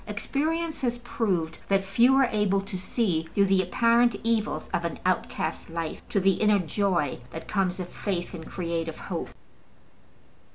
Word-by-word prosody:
Experience 315 Hz, +10 st, -2 dB
has 240 Hz, -2 st, 0 dB
proved 190 Hz, -9 st, -1 dB
that 195 Hz, 0 st, +2 dB
few 235 Hz, +7 st, +4 dB
are 270 Hz, -1 st, +5 dB
able 205 Hz, -2 st, +2 dB
to 195 Hz, 0 st, -6 dB
see 180 Hz, -4 st, -1 dB
through 200 Hz, -, +5 dB
the 190 Hz, -1 st, +3 dB
apparent 235 Hz, +6 st, +3 dB
evils 225 Hz, -2 st, 0 dB
of -, -, 0 dB
an -, -, -3 dB
outcast's -, -, -1 dB
life 165 Hz, -1 st, -4 dB
to 200 Hz, -, +2 dB
the 195 Hz, 0 st, +2 dB
inner 210 Hz, -1 st, +5 dB
joy 180 Hz, -4 st, 0 dB
that 160 Hz, +5 st, -8 dB
comes 190 Hz, -2 st, 0 dB
of 180 Hz, -, -3 dB
faith 180 Hz, -2 st, -3 dB
and 160 Hz, -3 st, -7 dB
creative 165 Hz, -2 st, -3 dB
hope. -, -, -4 dB
195 Hz, 160 wpm, -27 LUFS, 175-230 Hz, -, are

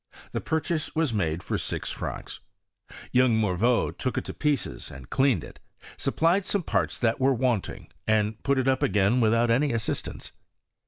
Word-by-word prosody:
The -, -, -2 dB
purchase 160 Hz, 0 st, -2 dB
was 160 Hz, -6 st, +1 dB
mside 85 Hz, -4 st, -1 dB
for -, -, -2 dB
six -, -, -3 dB
francs. -, -, -6 dB, 0.7 s
Youn^ 125 Hz, -2 st, +4 dB
Mor 105 Hz, -5 st, +1 dB
▼eau 115 Hz, +5 st, +2 dB
took 130 Hz, -, -3 dB
it -, -, -1 dB
to -, -, -5 dB
pieces 150 Hz, -3 st, -1 dB
and 65 Hz, -3 st, -12 dB
cleaned 130 Hz, -, +2 dB
it, -, -, -12 dB, 0.4 s
supplied 170 Hz, +5 st, +2 dB
some 200 Hz, 0 st, -1 dB
parts -, -, 0 dB
that 115 Hz, 0 st, +1 dB
were 135 Hz, 0 st, +3 dB
wanting, 120 Hz, -5 st, -1 dB, 0.2 s
and 110 Hz, 0 st, +1 dB
put 140 Hz, -1 st, +1 dB
it 130 Hz, 0 st, +1 dB
up 130 Hz, +1 st, +2 dB
again 115 Hz, -2 st, +3 dB
with 110 Hz, -1 st, +4 dB
out 115 Hz, 0 st, +3 dB
any 140 Hz, +5 st, +3 dB
assistajQce. 115 Hz, -3 st, -3 dB
125 Hz, 175 wpm, -26 LUFS, 110-140 Hz, 0.7 s, Youn^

